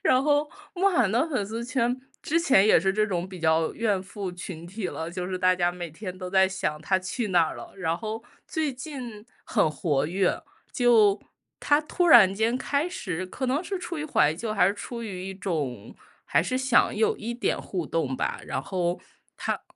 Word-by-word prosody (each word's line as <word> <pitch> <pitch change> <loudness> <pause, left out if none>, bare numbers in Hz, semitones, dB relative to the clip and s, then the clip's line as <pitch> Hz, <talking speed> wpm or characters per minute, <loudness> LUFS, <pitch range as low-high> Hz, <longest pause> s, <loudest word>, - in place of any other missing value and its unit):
然 255 +1 +4
后 295 +1 +3
然 290 +1 +3
后， 300 - -21 0.3
慕 380 +2 +3
寒 245 - +2
的 255 +8 +2
粉 255 -10 -1
丝 225 +4 -5
圈， 245 -1 0 0.3
之 330 +3 +1
前 260 - +5
也 215 - +6
是 190 +3 +2
这 215 +2 +2
种 180 -3 -2
比 185 -1 -9
较 160 -1 +2
怨 210 -5 0
妇 190 -1 -6
群 175 -2 -8
体 190 +2 -4
了， 160 +1 -5
就 180 0 -4
是 185 0 -3
大 185 0 +4
家 175 -1 +1
每 175 -1 -6
天 185 +3 -7
都 185 -1 -6
在 190 0 +4
想 150 -5 -3
他 185 +4 +1
去 190 +5 -3
哪 175 -3 +4
儿 - - -6
了， - - -9
然 165 -4 -1
后 220 0 -5 0.3
最 310 -3 -1
近 250 -5 -8 0.2
很 205 -9 +2
活 145 -1 0
跃， 185 +3 0 0.3
就 220 -5 +4 0.4
他 290 +1 +3
突 350 +4 0
然 225 - +8
间 225 +4 +1
开 285 +5 0
始 185 - -4
可 260 - -5
能 265 +6 +1
是 385 +1 -4
出 345 -2 -5
于 300 - -3
怀 150 - +3
旧， 215 +5 -4
还 190 - +4
是 195 - +2
出 235 +3 -7
于 190 -4 -5
一 195 - -6
种， 150 - -4 0.3
还 - - +2
是 255 +9 -1
想 260 +1 +3
有 440 0 +2
一 235 +2 -4
点 245 - -1
互 175 -5 -4
动 145 -6 -1
吧， - - -2
然 130 - -3
后 175 0 -1 0.4
他 - - -2
200 Hz, 230 characters per minute, -26 LUFS, 180-250 Hz, 0.4 s, 然